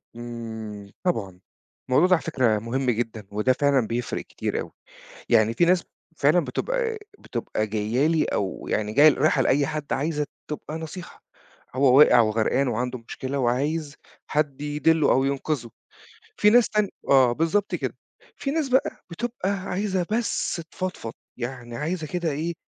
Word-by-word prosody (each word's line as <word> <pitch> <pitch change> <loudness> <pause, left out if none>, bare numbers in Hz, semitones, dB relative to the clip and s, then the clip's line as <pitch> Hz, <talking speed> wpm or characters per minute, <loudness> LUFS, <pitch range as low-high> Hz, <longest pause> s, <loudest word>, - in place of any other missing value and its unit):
إمم، 110 -4 -7
طبعًا، 100 - -1 0.5
الموضوع 150 +8 +5
ده 185 - +5
على - - -3
فكرة 120 -9 +1
مهم 125 +3 -1
جدًا 110 -3 -4
وده 105 +5 +2
فعلًا 140 -4 +2
بيفرِق 120 +2 -2
كتير - - -3
أوي، - - -8 0.6
يعني 115 0 +4
في 175 - +4
ناس 180 0 +3 0.3
فعلًا 150 +5 +4
بتبقى 460 - -2 0.2
بتبقى 110 -2 -3
جاية 110 +6 0
لي 160 -1 +2
أو 95 -2 -3
يعني 105 0 -1
جاية 145 +6 +7
رايحة 140 -2 +2
لأي 140 +2 +2
حد 155 -2 -4
عايزة 150 +1 -1 0.2
تبقى 150 0 -5
نصيحة، 165 +2 -9 0.5
هو 130 -1 +4
واقِع 125 -5 +8
وغرقان 115 +4 +2
وعنده 125 +2 -2
مشكلة 135 +1 -4
وعايز 140 +4 -1 0.3
حد 150 -3 0
يدلّه 150 +1 +2
أو 135 - +3
ينقذه. 135 -2 -2 0.7
في 210 - +5
ناس 240 +1 +5
تانية 210 -2 +1 0.2
آه 130 -3 +6
بالضبط 165 +9 0
كده، - - -2 0.4
في 275 - -3
ناس 305 -1 0
بقى 260 +1 +1
بتبقى 220 +2 -3
عايزة 190 -1 -1
بس 220 -6 -1
تفضفض، 185 -12 -5 0.3
يعني 120 -1 -6
عايزة 160 +1 -3
كده 170 0 -2
إيه 160 +4 -2
140 Hz, 150 wpm, -25 LUFS, 120-170 Hz, 0.7 s, واقِع